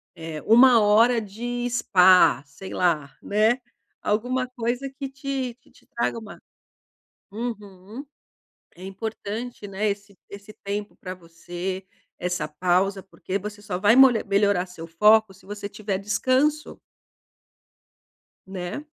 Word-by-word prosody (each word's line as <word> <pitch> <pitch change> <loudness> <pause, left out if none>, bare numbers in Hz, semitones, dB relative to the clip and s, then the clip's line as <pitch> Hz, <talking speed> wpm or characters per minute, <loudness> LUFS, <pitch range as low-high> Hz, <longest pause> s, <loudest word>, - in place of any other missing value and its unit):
eh, 160 -2 -7
1h 230 -1 +6
de 240 +4 -4
spa, 185 - +5
sei 145 +7 -10
lá, 155 -6 +1
né? 220 +5 +2 0.4
Alguma 250 +5 -1
coisa 245 +2 -3
que 270 0 -7
te 270 -2 -4
que - - -26
te - - -24
traga 235 0 -2
uma 215 -3 -11 0.9
uhum. 210 +1 -7 0.7
É 180 - -13
importante, 215 +3 -6
né, 200 +2 -1
esse 200 -1 -6
esse 200 +1 -11
tempo 205 +1 -4
pra 185 0 -7
você, 175 +2 -7 0.3
essa 175 -3 -2
pausa, 185 +5 0
porque 190 0 -5
você 205 +1 -8
só 180 -3 -4
vai 210 +4 +5
molha 260 -4 +6
melhorar 200 -2 +2
seu 165 -2 -10
foco 210 +5 +4
se 190 - -21
você 205 0 -6
tiver 205 -2 -3
descanso. 260 +9 0 1.7
Né? 190 +8 -6
205 Hz, 125 wpm, -24 LUFS, 185-235 Hz, 1.7 s, 1h